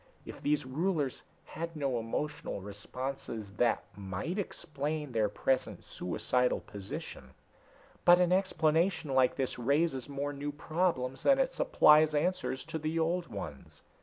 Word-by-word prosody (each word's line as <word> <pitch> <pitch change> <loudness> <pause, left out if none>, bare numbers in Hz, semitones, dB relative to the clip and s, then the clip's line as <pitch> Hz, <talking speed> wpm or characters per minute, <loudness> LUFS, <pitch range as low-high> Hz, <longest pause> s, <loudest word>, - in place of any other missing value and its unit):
If - - -9
these 145 -2 +1
rulers 150 0 -1 0.2
had 165 +1 -6
no 135 -5 0
emotional 130 +3 -3
responses, 110 +2 -6
that 120 -1 +2
might 100 - -4
explain 150 -5 -3
their 110 -3 +2
present 130 +5 -1
suicidal 125 +7 0
position. 95 -9 -8 0.7
But 175 0 +8
an 180 -1 +3
explanation 170 -4 +2
like 130 -1 +4
this 130 -2 -2
raises 140 +1 +1
more 140 +1 -3
new 145 +1 -4
problems 145 -5 -1
than 275 -1 +5
it 265 -1 +1
supplies 155 0 +5
answers 170 -3 0
to 160 0 -4
the 155 +2 -2
old 170 +1 +1
ones. 80 - -8
145 Hz, 135 wpm, -31 LUFS, 125-165 Hz, 0.7 s, But